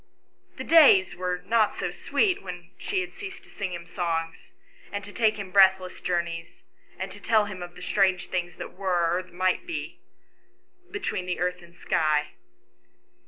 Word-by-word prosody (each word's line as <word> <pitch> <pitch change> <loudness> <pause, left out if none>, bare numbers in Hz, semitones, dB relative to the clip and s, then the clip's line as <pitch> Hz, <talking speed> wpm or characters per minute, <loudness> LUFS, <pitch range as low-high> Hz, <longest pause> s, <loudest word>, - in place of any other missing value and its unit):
The - - -4
days 280 - +6
were 180 0 -3
not 220 +1 +3
so - - -2
sweet 380 -5 +1
when 180 -1 -8
she 390 -2 -1
had 360 - -6
ceased 400 -2 -8
to - - -19
sing 195 -2 -4
him 170 -1 -6
songs, 165 -2 -3 0.4
and 205 0 -4
to 205 +1 -10
take 220 -2 +2
him 195 -2 -6
breathless 190 -1 +4
journeys, 170 -1 -3 0.3
and 190 0 -4
tell 220 -2 +4
him 195 -3 -7
of 175 0 -8
the 180 - -10
strange 190 -1 +1
things 175 -2 -2
that - - -8
were 175 -3 +1
or 180 - 0
that 185 - -18
might 185 - 0
be 340 - -5 0.9
between 300 - -3
the 180 - -2
earth 180 0 -1
and 170 0 -17
sky. 155 -3 +1
185 Hz, 170 wpm, -26 LUFS, 175-205 Hz, 0.9 s, days